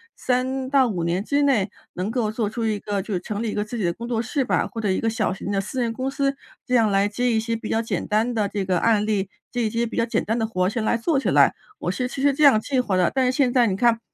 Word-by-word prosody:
3 260 +1 -1
到 270 -2 +4
5 180 -6 -2
年 175 +3 0
之 285 +5 +1
内 225 -9 +2 0.2
能 185 +3 -3
够 225 -2 -1
做 220 -2 -1
出 230 +1 -3
一 215 -2 0
个 205 -1 -2
就 205 +2 -5
是 180 - 0
成 210 +4 -4
立 220 - -1
一 - - -5
个 210 - -1
自 215 +3 -6
己 215 - -2
的 170 -1 +1
工 235 +4 -7
作 235 -2 -1
室 260 +3 -1
吧， - - 0
或 225 - -6
者 210 - 0
一 190 - +1
个 225 - 0
小 225 -3 0
型 195 +1 -5
的 195 -1 +1
私 210 +6 -5
人 230 -1 -1
公 260 +2 -2
司， 275 0 0 0.3
这 250 - -4
样 225 -3 +4
来 200 0 +2
接 245 +4 0
一 220 - +2
些 230 +1 -2
比 225 -1 -6
较 225 - +1
简 230 - -3
单 220 +3 +1
的 215 -3 0
这 205 -2 -2
个 180 -2 +1
案 215 0 +2
例， 205 -3 -1 0.2
接 245 -1 -1
一 220 - +1
些 230 +2 0
比 230 - -6
较 - - +2
简 235 - -1
单 225 +3 -1
的 225 - +1
活 185 -5 0
儿 - - +2
先 220 +2 -2
来 225 - +1
做 275 +5 +1
起 - - -1
来， - - +5 0.3
我 180 - -1
是 250 +7 -2
其 265 +1 -6
实 285 0 +4
这 300 +2 0
样 270 -6 +7
计 260 +4 -1
划 210 -6 0
的。 180 -1 +2
但 265 -1 +2
是 250 - +3
现 260 -2 +2
在 245 -2 +4
你 190 - 0
看 230 +2 +3
225 Hz, 335 characters per minute, -23 LUFS, 205-250 Hz, 0.3 s, 样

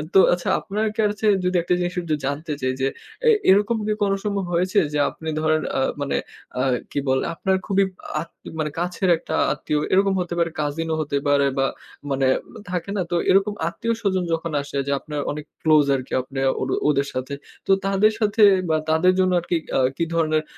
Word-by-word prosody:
তো - - +9
আচ্ছা 175 0 -2
আপনার 215 +2 -2
কাছে 210 0 +1 0.2
যদি 180 0 0
আর 175 - +3
একটা 180 - +1
জিনিস 175 0 -2
একটু 160 -3 -1
জানতে 150 +3 -3
চাই 130 0 0
যে, 135 - +2 0.4
অ্যা 465 - +5 0.2
এরকম 205 +4 +4
কি 215 - +2
কোন 200 -1 +2
সময় 200 -2 -1
হয়েছে 185 +4 +2
যে 150 - +1
আপনি 160 0 -7
ধরেন 155 0 +2 0.2
আ - - +2 0.2
মানে 140 - -1 0.4
আ - - +2 0.3
কি 145 - -1
বলে? 130 0 +2
আপনার 190 +3 0
খুবই 195 0 +3 0.4
আত 165 - -8 0.3
মানে 155 -1 0
কাছের 180 +2 -1
একটা - - -7 0.2
আত্মীয় 150 -1 -1
এরকম 195 +1 +4
হতে 175 -1 -4
পারে 165 -1 +1
কাজিনও 160 +2 -1
হতে 145 -2 -1
পারে 140 0 +4
বা 135 - +3 0.5
মানে 135 0 +1 0.4
থাকে 180 +1 -3
না? - - +1
তো - - +1
এরকম 195 +2 +4
আত্মীয়স্বজন 220 -5 -1
যখন 165 0 -2
আসে 140 0 -6
যে - - 0
আপনার 150 -1 -5
অনেক 150 0 -6 0.2
ক্লোজ 155 -2 +5
আরকি 130 -1 -5
আপনে 135 +1 -7 0.2
ওর - - -2 0.2
ওদের 140 -1 +1
সাথে। 130 +2 -4 0.3
তো - - +2
তাদের 195 +2 +3
সাথে 215 0 +1 0.3
বা 160 - +3
তাদের 160 +4 +4
জন্য 185 -1 +3
আরকি 175 0 -2
কি - - -21
আ - - +3 0.2
কি - - +1
ধরনের 155 -2 +1
170 Hz, 200 wpm, -23 LUFS, 150-195 Hz, 0.5 s, তো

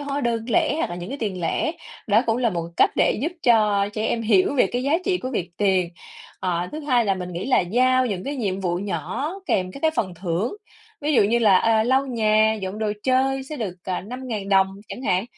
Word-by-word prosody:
hóa 285 0 -3
đơn 235 -3 -1
lẻ 235 - +2
hoặc - - -1
là 175 - -5
những 175 +1 -7
cái 280 - -5
tiền 200 -5 -3
lẻ, 240 - 0 0.3
đó 215 +2 +4
cũng 225 0 +2
là 245 -2 +1
một 170 -3 -3
cách - - +5
để - - +2
giúp 320 +4 -1
cho 210 -4 +3
trẻ 215 +1 -2
em 230 - -1
hiểu 215 +2 +3
về 265 - +4
cái 245 +1 -3
giá 280 +2 0
trị 370 -2 +1
của 255 - -5
việc 185 -8 -3
tiền. 190 -3 +2 0.5
Ờ, 175 -1 -1
thứ 305 - -5
hai 255 -6 +2
là 195 -2 +1
mình 180 -1 -6
nghĩ 175 +2 -4
là 260 - +4
giao 255 +7 +2
những 195 -5 -3
cái 285 +1 -3
nhiệm 195 -6 -2
vụ 175 -2 -1
nhỏ 205 - -3 0.2
kèm 185 - 0
các 275 - -10
cái 320 - +4
phần 195 - -2
thưởng, 180 - -2 0.4
ví 300 +1 0
dụ - - +6
như 220 +4 +2
là, 210 -5 +5
à, 225 -1 +3
lau 265 +3 +2
nhà, 220 -3 +3
dọn 190 +2 -4
đồ 215 -1 -1
chơi 265 +1 +1
sẽ 300 +3 -7
được, 210 -8 -4
ờ, 185 -1 -2
5.000 225 -2 -6
đồng 195 -1 +5 0.2
chẳng 255 - -7
hạn, 185 -4 +1
220 Hz, 240 wpm, -23 LUFS, 190-255 Hz, 0.5 s, dụ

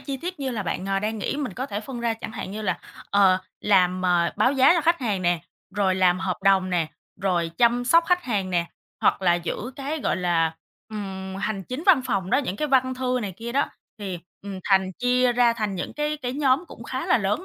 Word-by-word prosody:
chi 275 -2 -4
tiết 350 +2 -6
như 265 - -1
là 220 -4 -2
bạn, 185 +2 -3
ờ, 195 0 +1
đang 215 +2 -2
nghĩ. 275 - -2
Mình 285 -4 -3
có 260 +2 -3
thể 205 -4 -4
phân 240 +1 -7
ra 235 -1 0
chẳng 225 0 -8
hạn 190 - -6
như 215 +2 -5
là, - - -1 0.3
ờ, 195 -2 +5 0.2
làm, 185 -2 +3
ờ, 175 -1 +2
báo 255 - +3
giá 270 +5 +6
cho 340 - +2
khách 335 +1 +2
hàng 205 -7 -1
nè, 175 -1 +2 0.3
rồi 195 -2 +2
làm 185 -1 +3
hợp 185 -1 -2
đồng 190 -1 +4
nè, 170 -3 +1 0.3
rồi 175 -4 0
chăm 240 +1 +3
sóc 335 +6 +5
khách 360 -1 +2
hàng 200 -6 -1
nè, 170 -1 +1 0.3
hoặc - - +2
là 175 -2 +4
giữ 175 +9 -4
cái, 290 +3 -3
gọi - - 0
là, 165 -3 +1 0.3
ừm, 190 -3 -6
hành 195 -1 -2
chính 255 - -5
văn 325 -9 +6
phòng 195 -6 -2
đó, - - +4
những 230 -9 -2
cái 300 - -1
văn 260 -1 +3
thư 255 0 0
này 195 - -4
kia 235 +1 -6
đó 280 +1 +1 0.3
thì, 190 -4 -4 0.2
ừm, 200 -2 -6
thành 190 -1 +3
chia 245 +3 +2
ra 240 -1 +4
thành 215 -4 -2
những 180 - -4
cái 300 0 -1
cái 245 - -2
nhóm 275 +3 +2
cũng - - -11
khá 260 +2 -4
là 250 - +4
lớn 205 - -1
215 Hz, 240 wpm, -24 LUFS, 190-260 Hz, 0.3 s, giá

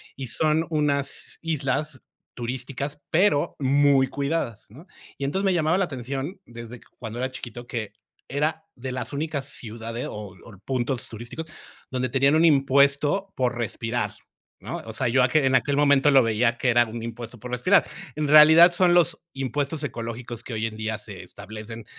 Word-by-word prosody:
Y 135 -1 -6
son 155 +6 +1
unas 145 -3 -1
islas 150 -3 -2 0.3
turísticas, 130 +4 -4
pero 170 -3 +2
muy 140 0 +4
cuidadas, 140 -4 -2
¿no? 150 - -15 0.3
Y 140 - -3
entonces 190 +8 -1
me 190 - +3
llamaba 165 0 +2
la 195 - +2
atención 140 - -5
desde 120 0 -10 0.2
cuando 115 0 -6
era 130 +1 -1
chiquito, 120 -1 -8
que 115 -4 -4 0.4
era 155 +4 -1
de 130 +1 -6
las 130 - -4
únicas 145 -1 -3
ciudades, 115 -1 -6
o 105 -2 -8
o 105 -4 -13
puntos 130 -1 -2
turísticos, 120 +8 -7 0.4
donde 130 0 -1
tenían 135 +3 +3
un 160 +1 +5
impuesto 140 +5 +3
por 125 -1 0
respirar, 115 -2 -2 0.4
¿no? - - -5
O 110 - -7
sea, 130 +2 -1
yo 130 +2 +3
a - - +4
que 150 +2 +3
en 135 - +2
aquel 140 +2 +2
momento 145 -1 +5
lo 135 -2 +6
veía 115 +2 +1
que 130 - +1
era 120 0 +5
un 115 +1 -6
impuesto 115 0 -7
por 125 +3 -8
respirar. 180 +11 +3 0.3
En 155 0 -1
realidad, 160 +4 +8
son 175 0 +4
los 175 -1 +3
impuestos 140 +3 -2
ecológicos 120 -2 -5
que 125 - -7
hoy 110 0 -1
en 110 -1 -4
día 110 0 -2
se 105 -2 -10
establecen 110 +2 -9
130 Hz, 175 wpm, -25 LUFS, 120-150 Hz, 0.4 s, realidad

